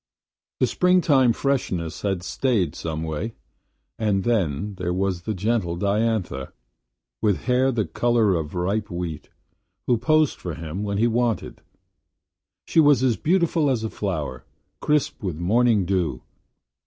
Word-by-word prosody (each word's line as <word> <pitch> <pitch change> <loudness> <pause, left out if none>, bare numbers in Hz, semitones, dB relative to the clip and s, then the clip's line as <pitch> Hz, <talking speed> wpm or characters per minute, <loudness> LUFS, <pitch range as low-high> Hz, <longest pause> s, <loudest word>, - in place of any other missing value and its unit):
The - - +4
spring 180 0 +3
time 135 -8 +4
freshness 95 - -1
had 95 -3 -1
stayed, 100 - 0
some 80 -2 -4
way. 80 +9 -4 0.6
And 105 -3 +1
then 100 -4 0
there 90 0 -1
was 95 -2 -1
the 110 +3 -3
gentle 100 -3 0
Diantha, 100 -7 -1 0.7
with 105 -4 +1
hair 130 +1 +2
the 115 -4 0
color 115 +4 +2
of 80 -1 -3
ripe 100 +4 -1
wheat, 85 -4 -5 0.6
who 120 - +3
posed 155 +4 +2
for 85 -4 -5
him 80 +4 -5
when 100 -1 -2
he 110 - +3
wanted. 120 -1 -1 1.0
She - - +2
was 145 -5 +5
as 125 -3 +3
beautiful 170 - +2
as 120 -4 0
a 110 - -3
flower, 75 - -3 0.4
crisp 150 -3 0
with 90 -7 -3
morning 105 +3 +2
dew. 90 -2 -1
105 Hz, 140 wpm, -23 LUFS, 90-120 Hz, 1.0 s, was